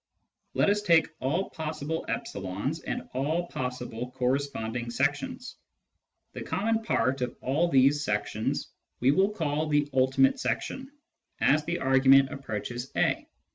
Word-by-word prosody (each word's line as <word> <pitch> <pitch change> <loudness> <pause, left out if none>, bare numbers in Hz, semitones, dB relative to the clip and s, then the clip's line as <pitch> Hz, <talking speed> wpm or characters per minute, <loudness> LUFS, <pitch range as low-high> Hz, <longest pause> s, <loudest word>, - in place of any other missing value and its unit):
Let 200 - +4
us 205 0 +1
take 170 -5 +4
all 160 +9 -1
possible 160 0 -4
e's 100 - -3
and - - -5
all 155 +7 0
possible 125 -1 -4
corresponding 125 -3 -1
sections. 145 - -2 0.8
The - - -6
common 225 +2 0
part 130 - 0
of 125 -1 -2
all 150 +7 +1
these 140 +1 +4
sections 105 -1 -2 0.3
we 130 +3 +4
will 190 +7 +3
call 155 -6 -1
the 145 -1 +2
" - - -37
ultimate 130 +1 +3
section 265 +1 -3 0.3
" - - -44
as 150 +2 +3
the 175 +1 -1
argument 135 0 +5
approaches 120 -1 -5
a. - - +1
135 Hz, 135 wpm, -28 LUFS, 125-160 Hz, 0.8 s, argument